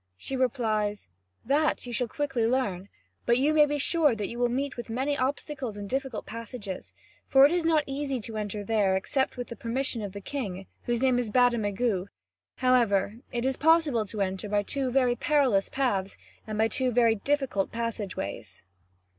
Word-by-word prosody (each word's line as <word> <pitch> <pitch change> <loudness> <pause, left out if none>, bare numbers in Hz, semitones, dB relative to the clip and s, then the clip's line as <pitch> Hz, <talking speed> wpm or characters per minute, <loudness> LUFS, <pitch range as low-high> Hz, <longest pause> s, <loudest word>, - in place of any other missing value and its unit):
She 270 - -2
replies: 220 -5 0 0.4
"That 290 +4 +1
you 245 - -6
shall 245 0 0
quickly 255 -2 -1
learn; 205 -7 -1 0.4
but 235 - +4
you 285 +4 +2
may 300 -1 +6
be 295 0 -1
sure 295 -2 +2
that 210 -2 -3
you 235 - -6
will 245 0 +2
meet 270 +3 -2
with 240 -1 -7
many 265 +5 0
obstacles 265 -3 -3
and 205 -1 -6
difficult 265 -1 -3
passages, 230 -3 -7 0.4
for 270 0 +7
it 290 - +4
is 350 -1 +1
not 320 -2 +3
easy 275 -1 -2
to 220 +1 -7
enter 210 -1 -3
there 205 -3 +2
except 265 +8 -1
with 245 - -5
the 235 - -6
permission 240 0 -2
of 200 -2 -5
the 200 - -6
king, 195 -5 -5 0.2
whose 240 0 0
name 255 -2 +4
is 240 -3 -1
Bademagu; 220 -4 +2 0.5
however, 230 -5 +2
it 240 0 -2
is 265 0 0
possible 300 -8 +3
to 210 0 -4
enter 190 +1 -2
by 205 0 +1
two 270 +4 -1
very 250 -1 +2
perilous 255 -8 +2
paths 200 -8 -1 0.3
and 215 -1 -4
by 220 +1 +3
two 255 +2 0
very 235 -1 +4
difficult 260 -3 -1
passage 230 -4 -3
ways. 100 - -6
240 Hz, 185 wpm, -28 LUFS, 210-270 Hz, 0.5 s, for